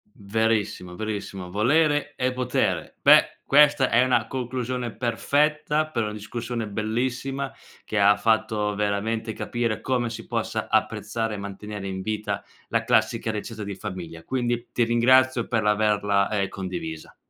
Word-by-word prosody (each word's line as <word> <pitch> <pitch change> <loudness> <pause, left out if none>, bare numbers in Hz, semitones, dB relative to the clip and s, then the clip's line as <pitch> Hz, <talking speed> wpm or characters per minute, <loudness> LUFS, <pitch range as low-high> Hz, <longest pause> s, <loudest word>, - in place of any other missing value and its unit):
Verissimo, 105 -3 -1
verissimo, 100 -3 -5
volere 145 - +2
è 130 0 0
potere. 125 -1 -1
Beh, - - +6
questa 145 -1 +5
è 120 +2 +5
una 125 -3 +2
conclusione 125 -1 -3
perfetta, 150 +5 +1
per 120 -7 -1
una 105 -1 -2
discussione 115 +2 -4
bellissima, 125 +6 -2 0.3
che 110 - -2
ha 100 0 +6
fatto 110 -2 +1
veramente 105 +2 -1
capire 115 0 -2
come 125 -2 0
si 115 - -7
possa - - -2
apprezzare, 110 +1 0
e - - -5
mantenere 100 0 -6
in 95 0 -4
vita 110 +1 -3 0.2
la - - 0
classica 110 - +2
ricetta 110 0 -5
di 100 0 -5
famiglia. 85 -3 -7
Quindi 120 +1 -2
ti 120 - +2
ringrazio 125 +1 +4
per 115 -2 +1
l'averla, 105 -1 +2
ehm, 100 -2 0
condivisa. 90 -5 -6
110 Hz, 140 wpm, -25 LUFS, 105-125 Hz, 0.3 s, Beh